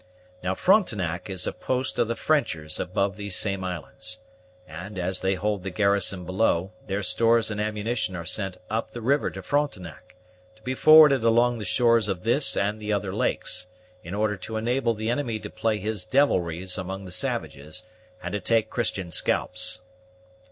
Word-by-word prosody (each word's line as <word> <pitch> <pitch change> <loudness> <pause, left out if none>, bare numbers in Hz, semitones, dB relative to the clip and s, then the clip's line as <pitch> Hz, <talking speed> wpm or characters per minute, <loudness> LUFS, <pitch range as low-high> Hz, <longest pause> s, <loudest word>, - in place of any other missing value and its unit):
Now 95 +1 -1
Frontenac 100 - +1
is 95 -2 -2
a - - -2
post 130 0 -2
of - - +3
the 115 - -2
Frenchers 80 - 0
above 100 +1 -1
these 100 -3 -1
same 100 -2 0
islands; 90 - -4 0.5
and, 90 +6 -8
as 90 +1 -1
they 95 +1 0
hold 100 +1 -1
the 95 - -4
garrison 100 -1 +1
below, 95 0 0
their 100 +1 -2
stores 115 +2 +4
and 105 0 -2
ammunition 105 -1 -2
are 85 -2 -6
sent 95 +1 -1
up 110 +2 -2
the 120 - -8
river 140 +6 +2
to - - -9
Frontenac, 110 - -3 0.4
to 110 - -25
be 130 - -2
forwarded 150 -3 +7
along 120 +1 +3
the 105 - -5
shores 115 +2 +3
of 95 -3 -3
this 120 +6 +3
and 105 +2 0
the 105 0 -4
other 100 -2 -1
lakes, 110 - 0 0.4
in 90 +1 -6
order 105 -1 0
to 110 +4 -5
enable 120 +1 0
the 110 +2 -2
enemy 120 -3 -1
to 105 -1 -8
play 110 -2 0
his 105 -1 -3
devilries 90 - +1
among 95 +1 -5
the 90 - -9
savages, 80 0 -3 0.4
and - - -4
to 105 - -2
take 110 +1 +1
Christian 100 -7 -2
scalps." 110 +6 0
105 Hz, 175 wpm, -25 LUFS, 95-115 Hz, 0.5 s, forwarded